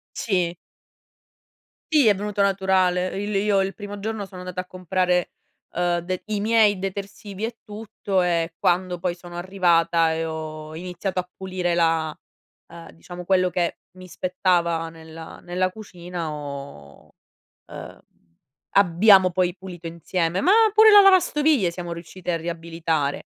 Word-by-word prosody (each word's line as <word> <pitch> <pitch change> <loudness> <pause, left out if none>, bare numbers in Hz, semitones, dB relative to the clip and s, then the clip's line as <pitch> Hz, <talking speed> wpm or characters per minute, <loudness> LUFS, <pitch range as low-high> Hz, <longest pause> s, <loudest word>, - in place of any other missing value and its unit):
Sì. 180 -5 -1 1.4
Sì, 290 -7 +5
è 205 - +5
venuto 205 +1 -3
naturale. 190 -2 +2 0.2
Il 210 - -3
io 200 -1 +2
il 195 0 -2
primo 205 -1 -8
giorno 215 0 -4
sono 185 -2 -11
andata 180 0 -6
a 185 - -3
comprare 180 -1 -1 0.4
ehm 175 0 0
de 185 +1 -4
i 210 -2 -2
miei 215 -2 +4
detersivi 195 +1 -5
e 230 0 -7
tutto 205 -3 -3
e 165 -1 0
quando 180 -1 +1
poi 175 0 -2
sono 175 -1 -11
arrivata 170 -3 +2
e 165 0 -2
ho 155 -1 -6
iniziato 185 +2 -4
a 180 0 -5
pulire 185 -2 -2
la, 165 -2 +1 0.6
ehm, 170 -1 -11
diciamo 175 +1 -10
quello 185 0 +2
che 175 -1 -1
mi 185 0 -13
spettava 170 -2 0
nella 160 0 -11
nella 185 +1 -1
cucina 180 -5 -7
ho 140 - -9 0.5
ehm, - - -10 0.8
abbiamo 190 0 +5
poi 180 0 0
pulito 175 -2 -9
insieme, 170 +1 -2
ma 375 - +4 0.2
pure 435 +1 +7
la 410 - +10
lavastoviglie 305 - +4
siamo 175 -1 -6
riusciti 175 +2 -7
a 170 - +1
riabilitare, 165 -3 -3
180 Hz, 140 wpm, -23 LUFS, 170-195 Hz, 1.4 s, la